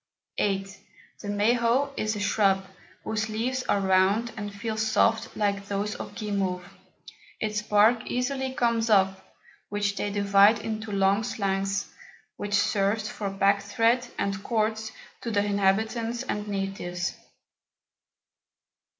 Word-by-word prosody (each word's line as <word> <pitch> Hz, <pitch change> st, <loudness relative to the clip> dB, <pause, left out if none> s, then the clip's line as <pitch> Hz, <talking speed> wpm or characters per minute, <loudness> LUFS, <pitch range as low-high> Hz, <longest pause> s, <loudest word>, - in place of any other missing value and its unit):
The 195 Hz, -1 st, +1 dB, 0.6 s
Mahot 235 Hz, +6 st, +2 dB
is 215 Hz, 0 st, -1 dB
a -, -, -4 dB
Shrub, 195 Hz, -2 st, +2 dB, 0.4 s
whose 215 Hz, 0 st, -2 dB
Leaves 245 Hz, +4 st, -1 dB
are 200 Hz, -, +3 dB
round 195 Hz, +5 st, +3 dB
and 205 Hz, -2 st, -5 dB
feel 220 Hz, +2 st, -4 dB
soft 220 Hz, +1 st, +1 dB
like 200 Hz, -1 st, 0 dB
those 205 Hz, +1 st, -2 dB
of -, -, -8 dB
Guimauve; 195 Hz, -4 st, -2 dB, 0.7 s
its 210 Hz, -1 st, -1 dB
Bark 215 Hz, +2 st, +3 dB
easily 265 Hz, +1 st, -1 dB
comes 235 Hz, -3 st, +1 dB
off, 190 Hz, -2 st, +3 dB, 0.5 s
which 205 Hz, 0 st, -1 dB
they 205 Hz, -, -1 dB
divide 200 Hz, +1 st, +5 dB
into 220 Hz, 0 st, -5 dB
long 195 Hz, +2 st, +2 dB
Slangs, 195 Hz, -3 st, -2 dB, 0.4 s
which 205 Hz, 0 st, -2 dB
serves 205 Hz, +2 st, +1 dB
for 210 Hz, -5 st, -4 dB
Packthread 200 Hz, +5 st, +2 dB
and 195 Hz, 0 st, -2 dB
Cords 220 Hz, -1 st, -1 dB, 0.3 s
to 235 Hz, -, -4 dB
the 205 Hz, -2 st, +1 dB
Inhabitants 220 Hz, +4 st, 0 dB
and 210 Hz, -5 st, -3 dB
Natives. 195 Hz, -3 st, -3 dB
205 Hz, 120 wpm, -27 LUFS, 200-225 Hz, 0.7 s, divide